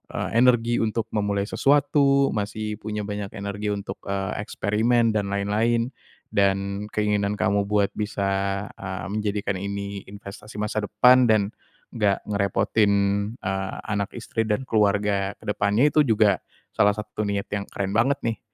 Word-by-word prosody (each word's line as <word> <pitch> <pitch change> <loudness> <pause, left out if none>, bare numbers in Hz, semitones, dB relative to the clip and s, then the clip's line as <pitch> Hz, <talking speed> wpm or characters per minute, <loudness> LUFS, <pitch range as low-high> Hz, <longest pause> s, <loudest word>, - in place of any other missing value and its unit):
eee, - - -2
energi 120 -1 +3
untuk 110 0 -1
memulai 100 -1 0
sesuatu, 140 +3 +3
masih 105 0 -3
punya 105 0 -4
banyak 105 -1 -5
energi 100 +1 -4
untuk, 100 0 -4
eee, 100 +1 -2
eksperimen 115 +2 +2
dan 105 -2 -1
lain-lain 110 +5 0 0.4
dan 100 +1 0
keinginan 105 -1 +1
kamu 100 0 +1
buat 105 -1 +2
bisa, 100 -1 -1 0.2
eee, 95 -1 -5
menjadikan 105 -2 -2
ini 100 0 -5
investasi 100 +2 -11
masa 105 0 -2
depan 125 0 +5
dan 110 -1 +2 0.4
nggak 105 -5 +1
ngerepotin, 100 +1 +1 0.5
eee, 95 0 -2 0.2
anak 100 +1 -2
istri 115 -1 -3
dan 105 +5 0
keluarga 105 -3 +1
ke - - -22
depannya 105 +9 +2
itu 155 - +2
juga 105 -3 +3 0.3
salah 100 0 +3
satu 105 0 -4
niat 100 -1 -2
yang 100 -1 -3
keren 100 -1 -3
banget 120 +6 +3
nih. 115 -1 -1
105 Hz, 140 wpm, -24 LUFS, 100-110 Hz, 0.5 s, depan